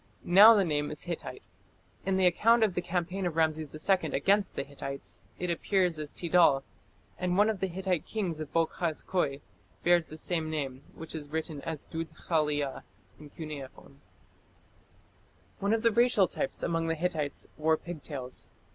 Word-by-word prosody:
Now 205 +6 +9
the 200 -3 +3
name 145 -2 0
is 150 - -5
Hittite. 175 - -6 0.6
In 190 -1 +2
the 190 - +3
account 225 +6 +4
of 210 -4 +2
the 180 - -1
campaign 180 +2 -2
of 165 - -4
Rameses 155 -2 0
II 185 -6 +2
against 200 +7 +2
the - - -1
Hittites 140 0 -7 0.2
it 180 -1 -2
appears 180 -1 +1
as 150 -1 -4
Tid^{c}al, 165 -6 +4 0.6
and 180 0 0
one 210 +2 +5
of 210 - -6
the 190 - 0
Hittite 185 -2 -2
kings 185 -8 -2
of 155 -2 -6
Boghaz 165 -1 -1
Köi 145 -7 -1 0.4
bears 175 -1 +3
the 155 - -8
same 160 -1 -2
name, 140 -4 -3
which 160 - -8
is 150 -3 -6
written 155 -1 -4
as 160 -1 -5
Dud 165 0 -4
khaliya 150 -5 -1 0.4
in 150 -1 -11
cuneiform." 140 -2 -9 1.6
One 200 +1 0
of 225 0 +1
the 230 - +5
racial 235 -4 +4
types 135 - -3
among 165 -1 0
the 165 - 0
Hittites 155 -4 -2
wore 160 +1 +2
pigtails. 145 -7 -5
165 Hz, 165 wpm, -30 LUFS, 150-185 Hz, 1.6 s, Now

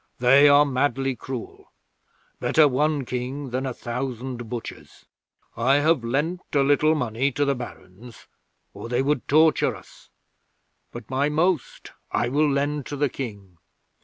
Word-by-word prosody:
They 135 +4 +6
are 145 +1 +6
madly 135 -1 0
cruel. 125 0 -8 0.7
Better 155 -2 +4
one 145 +1 0
King 130 +2 -5
than 130 +2 -2
a 130 - -3
thousand 120 -1 -5
butchers. 120 -1 -8 0.5
I 130 +4 +2
have 145 -2 +2
lent 150 +9 -1
a 140 - +3
little 150 +3 +3
money 125 0 -1
to 145 - 0
the 140 - +1
Barons, 120 -2 -11 0.5
or 115 - -8
they 125 +2 +1
would 145 -2 -1
torture 155 +2 +3
us, - - -17 0.8
but 120 -1 -9
my 140 +3 +1
most 160 -1 -1 0.2
I 120 - 0
will 150 +3 +2
lend 145 0 -1
to 145 - -5
the 145 0 0
King. 100 -10 -8
135 Hz, 145 wpm, -24 LUFS, 120-145 Hz, 0.8 s, They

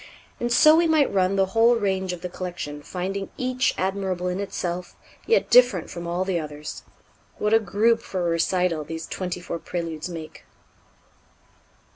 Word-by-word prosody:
And 240 0 -1
so 305 +6 +7
we 335 +1 +4
might 310 -3 +3
run 190 0 +2
the 195 -1 +3
whole 230 +1 +5
range 190 -4 -1
of 180 -1 -6
the 180 - -3
collection, 175 -5 -6
finding 190 +4 -4
each 255 0 0
admirable 190 -1 -1
in 180 +1 -3
itself, 180 -3 -4 0.3
yet 460 - +2
different 245 -9 +5
from 170 -1 -6
all 175 +2 -1
the 185 -3 0
others. 150 -1 -7 0.6
What 210 +1 0
a 225 - +7
group 220 +2 +2
for 185 - -4
a 170 - +1
recital 170 -1 +1
these 160 +2 -6
twenty 180 -1 -4
four 170 -1 -5
Préludes 165 -2 -4
make! 165 -3 -8
185 Hz, 165 wpm, -24 LUFS, 170-210 Hz, 0.6 s, so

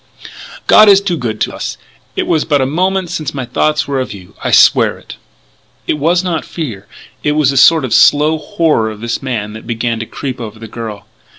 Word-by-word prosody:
God 215 -1 +7
is 195 -1 +7
too 200 -3 -2
good 115 -7 -4
to - - -1
us. - - -5
And - - -29 0.3
it - - -3
was 160 -2 +1
but 145 -3 +1
a 130 - +1
moment 185 +5 -1
since 155 -5 -4
my 135 -2 -3
thoughts 150 +5 0
were 140 -1 -1
of 130 - -4
you! 90 -2 -14
I - - -1
swear - - +4
it! - - -12 0.3
" - - -38
It 150 - -1
was 175 +5 +2
not 170 -4 -2
fear; 120 - -6 0.3
it 150 - 0
was 150 -3 +2
a - - -4
sort 155 +2 +5
of 125 - -3
slow 150 +2 +4
horror 150 -7 0
of 105 -1 -9
this 115 0 -3
man 110 -6 -4
that 110 +1 -10
began 115 -1 -2
to 115 - -5
creep 130 -3 -6
over 110 -1 -7
the 115 0 -9
girl. 105 -2 -7
140 Hz, 225 wpm, -14 LUFS, 115-160 Hz, 0.3 s, God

